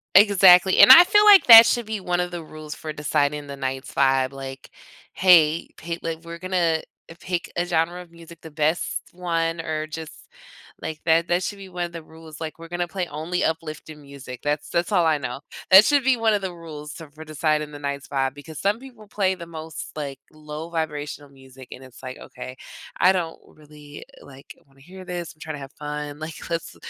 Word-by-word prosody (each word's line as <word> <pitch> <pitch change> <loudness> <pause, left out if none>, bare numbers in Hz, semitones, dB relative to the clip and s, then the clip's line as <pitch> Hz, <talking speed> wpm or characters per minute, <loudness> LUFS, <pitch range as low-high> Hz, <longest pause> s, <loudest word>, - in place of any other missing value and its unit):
Exactly, 190 -2 +6
and - - +9
I 330 +7 +11
feel 415 +2 +4
like 410 -2 +7
that 230 -1 +12
should 235 -1 0
be 220 -1 -3
one 180 -2 -2
of 180 0 -1
the 175 -2 -7
rules 155 -1 -9
for 155 -1 -7
deciding 145 0 -1
the 140 - -7
night's 135 0 -5
vibe, 135 -1 +2
like, 135 -1 -9 0.4
"Hey, 170 -3 +4
pay" 170 0 -5
like, 165 -1 -4
"We're 170 0 -9
gonna, 170 -3 0 0.3
eh, 165 - -11
pick 180 -2 -4
a 175 - 0
genre 170 +1 -1
of 170 - -22
music, 170 0 -15
the 160 - -11
best 155 +2 -1
one, 165 -2 -2
or 155 -1 -4
just" 160 0 -8 0.7
like 155 -1 -6
that, 165 +1 +3
that 175 +1 0
should 200 +1 -5
be 195 -1 -11
one 180 -1 -3
of 170 - -9
the 165 - -7
rules. 160 0 -14
Like, 160 -1 -6
"We're 165 0 -11
gonna 175 +1 -3
play 185 0 -4
only 160 +4 -3
uplifting 155 -1 -4
music," 140 -3 -11
that's 145 0 -2
that's 170 +4 -1
all 180 -4 +3
I 155 -2 +2
know. 125 0 -6 0.3
That 190 +3 +9
should 285 -2 +3
be 260 -1 +3
one 225 -1 +2
of 205 - 0
the 190 -1 -4
rules 155 -4 -10
t 165 - -10
for 155 +1 -11
deciding 155 -1 -1
the 145 - -9
night's 140 -1 -5
vibe, 135 -2 -1
because 145 +2 -11
some 205 +3 0
people 245 -5 -14
play 195 -2 0
the 170 -2 -10
most, 160 -1 -8
like, 140 -3 -6
low 155 +1 -9
vibrational 150 -3 -4
music, 130 -1 -16
and 130 - -10
it's 130 -2 -15
like, 130 0 -8
okay, 130 0 -10 0.4
I 185 - +5
don't 170 -3 -3
really, 150 -1 -14 0.2
like, 135 -1 -14
wanna 135 0 -25
hear 185 +5 -13
this, 175 -2 -6
I'm - - -33
trying 155 -2 -6
to - - -10
have 135 0 -10
fun, 150 0 -6
like, 155 +1 -8
let's 165 -1 -4
160 Hz, 215 wpm, -23 LUFS, 150-180 Hz, 0.7 s, that